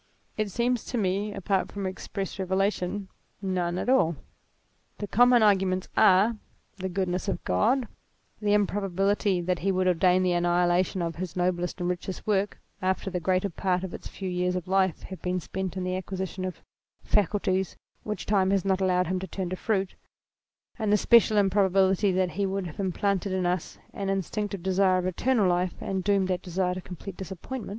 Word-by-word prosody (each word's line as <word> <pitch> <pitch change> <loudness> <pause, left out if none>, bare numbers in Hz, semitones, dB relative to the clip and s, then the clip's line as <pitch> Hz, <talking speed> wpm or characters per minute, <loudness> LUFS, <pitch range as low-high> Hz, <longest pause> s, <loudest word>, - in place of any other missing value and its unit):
It 215 -1 -1
seems 240 +3 0
to 245 - -3
me, 200 0 0
apart 195 -1 -1
from 200 -1 -4
express 195 +1 -5
revelation, 190 +1 -1 0.3
none 180 -3 -1
at - - -3
all. 250 -11 +3 0.8
The - - -4
common 245 +2 +5
arguments 190 -3 +2
are, 205 +5 +5 0.4
the 190 -1 -3
goodness 180 0 -2
of 195 - -2
God; 250 +3 +2 0.5
the 205 0 +3
improbability 195 -1 +1
that 180 0 -1
he 195 +3 +1
would 185 0 +1
ordain 180 +1 +3
the 180 - +2
annihila 175 +1 +3
tion 185 - -3
of 165 -1 -3
his 180 -2 -5
noblest 180 0 -1
and 175 - -1
richest 180 +1 -4
work, 205 -1 0 0.2
after 190 +1 -1
the 180 - -1
greater 185 +3 0
part 185 +1 0
of 190 - -5
its - - -7
few 190 - -6
years 180 0 0
of 180 0 -4
life 190 -2 +1
had 190 - -9
been 180 0 -1
spent 190 +1 -4
in 185 - -2
the 185 0 -1
acquisition 190 0 -4
of 185 - -6 0.4
faculties 190 -2 +1 0.3
which 210 -3 -5
time 195 -2 +2
is 195 -2 +1
not 190 -1 +1
allowed 180 -1 +2
him 185 +2 -1
to 190 - -6
turn 185 0 -4
to - - -1
fruit; 195 -1 -1 0.9
and 215 -2 0
the 210 - +5
special 220 0 +5
improbability 195 0 +3
that 185 -1 +1
he 200 0 -1
would 195 0 -2
have 165 +1 -9
implanted 195 0 0
in 185 -1 0
us 175 -1 -2 0.2
an 195 -1 -3
instinctive 195 0 -2
desire 190 0 +3
of 180 - -1
eternal 210 +3 +2
life, 180 0 +1
and 190 -1 -2
doomed 195 -1 +2
that 180 -1 -1
desire 180 0 -1
to 185 - -5
complete 180 +1 -8
disappointment. 190 +6 -6
190 Hz, 185 wpm, -27 LUFS, 180-200 Hz, 0.9 s, common